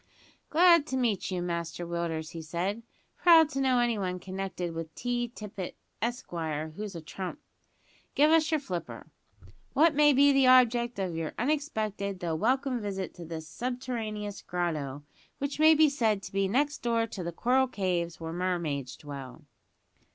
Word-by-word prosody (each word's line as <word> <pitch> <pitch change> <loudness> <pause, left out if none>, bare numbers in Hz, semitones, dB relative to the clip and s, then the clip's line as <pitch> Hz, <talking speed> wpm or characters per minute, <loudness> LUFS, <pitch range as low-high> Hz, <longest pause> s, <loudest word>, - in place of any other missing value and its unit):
"Glad 335 -2 +6
to 260 - -2
meet 230 -7 0
you, 180 -2 -2
Master 170 -1 -3
Willders," 170 -2 -3
he 165 - -6
said. 175 +7 -3 0.4
"Proud 330 -3 +7
to 275 -2 -2
know 260 -2 +3
anyone 210 -7 0
connected 185 -2 -4
with 165 -1 -6
T. 245 0 -1
Tippet, 210 -5 -7 0.3
Esquire, 160 - -3
who's 205 -1 -6
a 165 - -6
trump. 185 - -6 0.8
Give 300 +2 +5
us 320 -1 +4
your 315 -1 +2
flipper. 180 -11 -6 0.6
What 320 +2 +5
may 295 0 +6
be 280 +1 +6
the 270 -1 +4
object 240 -2 +5
of 185 -4 -2
your 165 -1 -4
unexpected, 220 - -1
though 170 -2 -2
welcome 250 - +1
visit 195 -3 -4
to 175 - -9
this 160 -1 -6
this - - -14
subterraneous 225 -2 -4
grotto, 155 -6 -3 0.3
which 280 +1 -3
may 315 +1 +7
be 310 0 +6
said 220 -8 +1
to - - -8
be 195 0 +1
next 285 +8 +1
door 230 -2 +1
to 200 -5 -6
the 170 - -3
coral 255 +9 +2
caves, 180 -7 -2
where 165 0 -5
the 170 - -5
mermaids 165 -8 -2
dwell." 140 -3 -9
205 Hz, 165 wpm, -29 LUFS, 170-255 Hz, 0.8 s, Proud